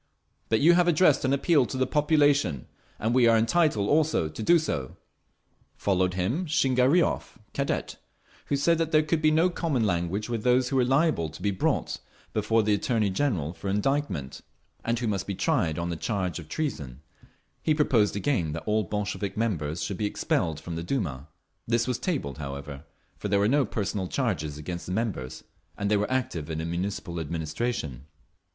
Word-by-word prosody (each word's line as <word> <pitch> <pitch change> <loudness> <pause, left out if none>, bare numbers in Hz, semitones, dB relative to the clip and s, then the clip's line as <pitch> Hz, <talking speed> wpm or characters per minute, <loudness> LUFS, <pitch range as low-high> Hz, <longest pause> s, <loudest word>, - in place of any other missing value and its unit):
But 110 - +2
you 170 +4 +7
have 175 0 +4
addressed 165 -3 +4
an 130 - +1
Appeal 140 -1 +3
to 130 - -5
the 130 - +2
population, 145 - +2 0.3
and 110 +2 -1
we 125 -2 +5
are 115 -1 +5
entitled 115 -3 +2
also 150 - +2
to 110 - -8
do 170 +10 +5
so…." 70 - -3 0.8
Followed 95 -2 +1
him 120 - -1
Shingariov, 135 +3 +2 0.2
Cadet, 140 0 -2 0.5
who - - +1
said 165 +4 +2
that 165 -1 0
there 155 0 +4
could 155 +1 0
be 155 - +5
no 160 +3 +4
common 150 -10 0
language 90 +2 -1
with 115 -3 -3
those 125 0 +3
who 135 - 0
were 130 - +4
liable 135 - +2
to 80 - -12
be 100 - +2
brought 95 - -1 0.3
before 110 +1 +2
the 105 0 +2
Attorney 105 0 +1
General 95 - -1
for 95 - -5
indictment, 100 - -1 0.4
and 115 +1 0
who 120 - -2
must 100 -3 -2
be 100 - -3
tried 80 -3 +1
on 85 0 -2
the - - -2
charge 90 -1 -2
of 80 - -11
treason…. 75 - -4 0.6
He 155 - +2
proposed 120 -10 +2
again 100 - 0
that 80 - -5
all 110 0 +2
Bolshevik 105 0 -3
members 85 -8 -1
should 100 - -3
be 105 - 0
expelled 80 -6 -1
from 85 +1 -6
the 85 - -3
Duma. 80 - -3 0.4
This 115 +1 +1
was 125 -1 -1
tabled, 125 - -3
however, 70 +1 -7 0.3
for - - -3
there 100 0 +2
were 100 - +3
no 140 +3 +3
personal 100 -3 -2
charges 90 - -2
against 85 +3 -6
the - - -4
members, 100 - -3 0.3
and 100 +1 -1
they 105 - +4
were 105 +1 -1
active 115 - -2
in 80 - -3
the 80 - -3
Municipal 85 0 -3
administration. 80 - -3
105 Hz, 185 wpm, -27 LUFS, 85-135 Hz, 0.8 s, you